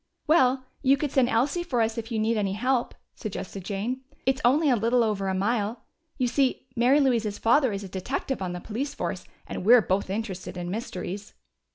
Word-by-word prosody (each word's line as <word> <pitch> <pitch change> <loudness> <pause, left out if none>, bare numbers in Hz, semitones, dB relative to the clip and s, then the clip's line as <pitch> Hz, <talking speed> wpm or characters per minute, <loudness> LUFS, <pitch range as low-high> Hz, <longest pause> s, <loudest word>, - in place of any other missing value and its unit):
"Well, 260 -4 +3 0.2
you 275 0 +4
could 290 -1 -2
send 260 -3 +3
Elsie 275 +9 +1
for 260 -8 -1
us 225 0 +1
if 230 +1 -6
you 225 - -1
need 220 +2 +1
any 200 -3 0
help," 250 +3 0 0.2
suggested 195 -2 -6
Jane. 215 +7 -3 0.2
"It's 265 0 +1
only 290 +6 +4
a - - +5
little 235 +2 +2
over 205 -3 -1
a 190 - 0
mile. 210 +3 0 0.4
You 255 - +1
see, 260 +2 +1
Mary 255 +4 +4
Louise's 230 -7 +1
father 255 +2 +3
is 200 0 -4
a - - -6
detective 195 +7 -3
on 180 -2 -2
the 180 - -4
police 250 +9 -4
force, - - -4 0.2
and - - -5
we're 235 +3 +7
both 190 +1 0
interested 190 -3 -4
in 175 0 -4
mysteries." 200 -2 -5
230 Hz, 200 wpm, -26 LUFS, 200-260 Hz, 0.4 s, we're